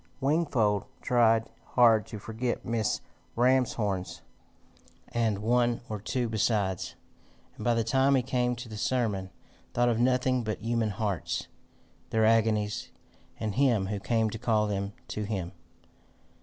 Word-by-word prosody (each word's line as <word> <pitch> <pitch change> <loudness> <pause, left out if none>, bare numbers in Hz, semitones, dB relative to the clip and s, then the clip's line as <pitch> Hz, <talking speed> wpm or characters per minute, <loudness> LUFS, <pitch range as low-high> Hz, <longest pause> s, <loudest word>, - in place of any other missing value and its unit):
Wingfold 130 - +1 0.2
tried 115 -2 +3 0.3
hard 115 -4 +5
to 110 - -7
forget 115 +4 -3
Mrs. 115 -3 0 0.3
Ramshorn's, 115 -6 +1 0.9
and 115 -3 0
one 120 +1 +2
or 105 -2 -4
two 120 +3 -1
besides, 105 -4 0 0.6
and - - -8
by 120 -1 +2
the 115 - +1
time 135 +4 +3
he 130 - +2
came 125 -1 0
to 120 +1 -8
the 110 -1 -8
sermon, 105 -6 0 0.5
thought 120 0 +3
of 115 -1 +1
nothing 125 0 +2
but 110 -1 -3
human 115 0 0
hearts, 100 -2 -2 0.6
their 110 -1 +2
agonies, 110 -2 +2 0.5
and 110 -2 -2
him 120 -7 +3
who 100 +1 -3
came 110 +1 +1
to 110 - -6
call 110 -2 +2
them 100 -1 -2 0.2
to 105 - -3
him. 100 -5 -3
115 Hz, 140 wpm, -29 LUFS, 105-120 Hz, 0.9 s, hard